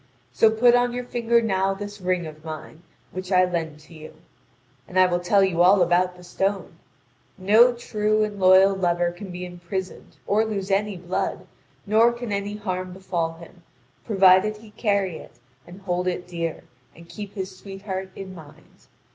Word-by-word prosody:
So 125 - +4
put 235 +2 +4
on 245 0 +2
your 250 0 -3
finger 235 -1 +1
now 195 -2 0
this 205 0 -8
ring 180 -1 -1
of 155 0 -10
mine, 160 0 -8 0.3
which 185 +1 -7
I 185 -1 +5
lend 165 -4 -4
to 160 - -17
you. 155 -1 -12 0.7
And 185 - 0
I 185 - +7
will 175 -1 0
tell 195 +3 +3
you 180 -3 +1
all 185 +1 +6
about 180 +1 +1
the 180 - -14
stone: 195 +2 -3 0.6
no 215 +6 +5
true 215 -2 0
and 210 -1 -4
loyal 190 +1 +6
lover 175 -2 0
can 190 +3 -10
be 180 0 -6
imprisoned 180 +1 -7
or 210 +2 +2
lose 200 -3 -3
any 200 0 0
blood, 175 +1 -3 0.4
nor 220 +3 +4
can 235 -2 -6
any 200 +1 -3
harm 185 -3 -4
befall 175 -3 -3
him, 170 +2 -15 0.4
provided 195 0 +4
he 215 0 -15
carry 200 -6 -1
it - - -13 0.3
and 180 +3 -12
hold 180 -1 -2
it 180 0 -2
dear, 170 -2 -4 0.3
and 170 0 -15
keep 205 +3 -9
his 190 -1 -5
sweetheart 195 0 -6
in 190 -1 -8
mind. 155 -5 -16
190 Hz, 175 wpm, -24 LUFS, 175-205 Hz, 0.7 s, I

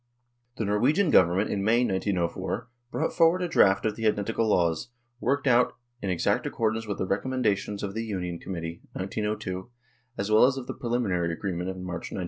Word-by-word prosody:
The 110 - -1
Norwegian 135 - +2
Government 95 +1 +4
in 100 - -1
May, 115 +4 +3
1904, 95 -1 -1 0.2
brought 155 - -1
forward 170 +2 +4
a - - 0
draft 95 - +4
of 110 -1 0
the 115 0 0
identical 110 +2 0
laws, 85 +2 +1 0.3
worked 140 +3 0
out 125 -2 +4 0.3
in 100 - -2
exact 90 -2 +1
accord 110 -1 0
with 100 - -3
the - - -1
recommendations 105 -1 -1
of 100 -1 -3
the 115 +2 -2
Union 90 -6 -4
Committee 85 -2 -6
(1902) 95 0 -3 0.5
as 100 +2 -2
well 110 +3 +7
as 135 0 0
of 130 - -5
the - - -5
preliminary 100 -9 -1
agree 95 +3 -3
ment 90 +2 -3
of 95 - -5
March, 90 -2 -5
1903. - - -4
105 Hz, 185 wpm, -27 LUFS, 95-120 Hz, 0.5 s, well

